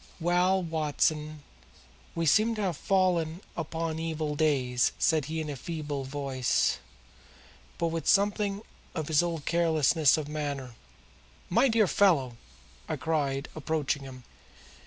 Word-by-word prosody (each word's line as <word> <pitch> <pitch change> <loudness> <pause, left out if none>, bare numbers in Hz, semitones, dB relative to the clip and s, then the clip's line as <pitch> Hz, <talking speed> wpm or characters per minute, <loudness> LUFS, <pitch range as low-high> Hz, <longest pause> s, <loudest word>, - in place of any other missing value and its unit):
"Well, 180 +2 +2
Watson, 155 -1 -1 0.7
we 165 0 -1
seem 220 +9 +4
to 215 - -2
have 180 -4 0
fallen 180 -3 +1
upon 165 0 -3
evil 160 -2 -2
days," 135 -5 +1
said 155 -3 +2
he 160 +3 -3
in 155 - -3
a 145 - -4
feeble 145 -1 -5
voice, 135 -2 0 1.0
but 170 - 0
with 165 -2 -4
something 205 0 +2 0.3
of 155 -3 -3
his 155 0 +4
old 170 -4 -3
carelessness 160 -3 +3
of 155 -2 -4
manner. 145 -4 -4 0.8
"My 265 - +4
dear 225 -3 +3
fellow!" 145 -9 +2 0.5
I - - 0
cried, 140 -4 -1
approaching 155 -2 -1
him. 130 -2 -10
160 Hz, 130 wpm, -28 LUFS, 145-170 Hz, 1.0 s, seem